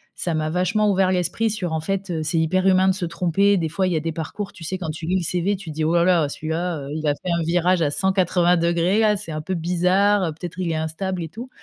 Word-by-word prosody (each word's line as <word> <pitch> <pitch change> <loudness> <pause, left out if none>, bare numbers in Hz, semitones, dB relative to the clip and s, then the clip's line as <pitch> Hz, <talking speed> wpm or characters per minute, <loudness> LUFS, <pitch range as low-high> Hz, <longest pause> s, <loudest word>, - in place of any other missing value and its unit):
ça 170 - -2
m'a 155 0 -1
vachement 185 +5 +1
ouvert 190 -1 +2
l'esprit 185 +5 0
sur, 185 -6 -3
en 160 - 0
fait, 195 +3 -3
heu, 160 -2 -2
c'est 155 +2 -1
hyper 185 +4 +1
humain 190 0 +4
de 190 - +4
se 185 -1 -3
tromper, 180 +4 +2
des 165 -3 -1
fois, 190 +4 0
il 180 - 0
y - - 0
a - - +1
des 165 +1 -2
parcours, 170 +6 -5
tu 170 - -12
sais, 185 +4 -3
quand 175 -4 -5
tu 160 +1 -7
lis 185 +2 +2
le 180 - -2
CV, 180 +4 0
tu 185 -4 -8
te - - -10
dis: 155 - -1
«Oh 160 +2 +1
là 170 - +4
là, 170 -5 +3
celui-là, 160 +3 -3
heu, 140 - -7
il 155 0 -3
a 145 - +3
fait 180 - -5
un 170 0 +1
virage 175 +2 +2
à 150 - +2
180° 175 0 +2
là, 215 -2 +3
c'est 195 -4 -7
un 155 0 -4
peu 185 +5 -3
bizarre, 180 +2 +2
peut-être 175 +2 -8
il 175 -2 -1
est - - -1
instable», 170 +3 -3
et 160 - -6
tout, 235 - -9
175 Hz, 285 wpm, -22 LUFS, 160-190 Hz, -, humain